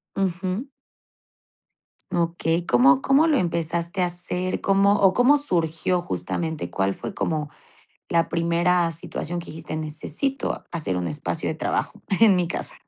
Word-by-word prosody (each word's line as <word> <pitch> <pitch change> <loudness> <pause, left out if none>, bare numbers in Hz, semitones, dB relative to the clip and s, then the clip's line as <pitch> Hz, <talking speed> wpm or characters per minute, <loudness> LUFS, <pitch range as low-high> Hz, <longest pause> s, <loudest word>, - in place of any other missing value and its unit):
Ujú. 190 +5 -2 1.4
Okey, 170 0 0
¿cómo 135 +3 +5
cómo 275 - +4
lo 310 - +3
empezaste 170 0 -1
a - - +3
hacer? 180 +1 -2
¿Cómo 195 +1 +4
o 190 -1 +5
cómo 250 +6 +5
surgió 175 - 0
justamente? 160 - -3
¿Cuál 95 +2 0
fue 120 - -7
como 155 -2 -2 0.6
la 165 -1 +2
primera 170 +1 +2
situación 170 +2 -4
que 170 - -10
dijiste: 160 0 -7
"Necesito 155 - -3
hacer 155 - -2
un 90 -1 -2
espacio 75 - -3
de - - -1
trabajo - - -2 0.2
en 215 -4 +7
mi 180 -1 +1
casa"? 170 - -4
170 Hz, 140 wpm, -24 LUFS, 160-185 Hz, 1.4 s, en